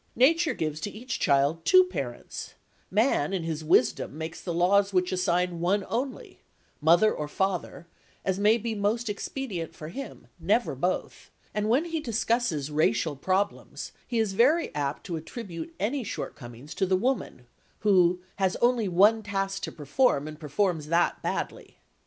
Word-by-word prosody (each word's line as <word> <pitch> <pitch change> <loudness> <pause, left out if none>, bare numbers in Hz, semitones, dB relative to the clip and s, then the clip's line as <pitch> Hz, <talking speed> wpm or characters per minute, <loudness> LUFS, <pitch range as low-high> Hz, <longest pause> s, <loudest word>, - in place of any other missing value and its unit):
Nature 325 +6 +4
gives 155 -1 -2
to 205 - -2
each 230 +5 -5
child 140 +3 +2
two 370 - +7
parents; 135 - -6 0.3
man 205 - +2
in 185 -3 -1
his 160 -1 -3
wisdom 150 -1 +2
makes 160 +1 -6
the 175 - -4
laws 195 +4 +3
which 180 -1 +1
assign 180 -1 0
one 190 +4 +1
only, 255 +3 -4 0.4
mother 170 +7 +5
or 150 - -4
father, 180 0 -2 0.4
as 190 0 0
may 210 +3 +5
be 230 0 -3
most 215 +3 0
expedient 205 - -4
for 155 - -8
him,—never 275 +10 -2
both,—and 210 0 -3
when 265 +8 +3
he 330 -1 -2
discusses 230 - 0
racial 150 0 +1
problems, 190 +8 -2 0.2
he 240 - -2
is 220 -3 +1
very 285 - +3
apt 145 -1 -2
to 170 -4 -3
attribute 165 -2 -7
any 245 +7 -1
shortcomings 135 - -7
to 190 - 0
the 185 0 +3
woman, 210 - -2 0.4
who 180 -3 +4 0.2
"has 190 -1 +1
only 240 -3 +2
one 205 +5 +5
task 195 -1 -2
to - - -4
perform 150 - +1
and 155 0 -8
performs 160 0 -1
that 170 +2 +1
badly." - - -4
190 Hz, 150 wpm, -27 LUFS, 160-225 Hz, 0.4 s, two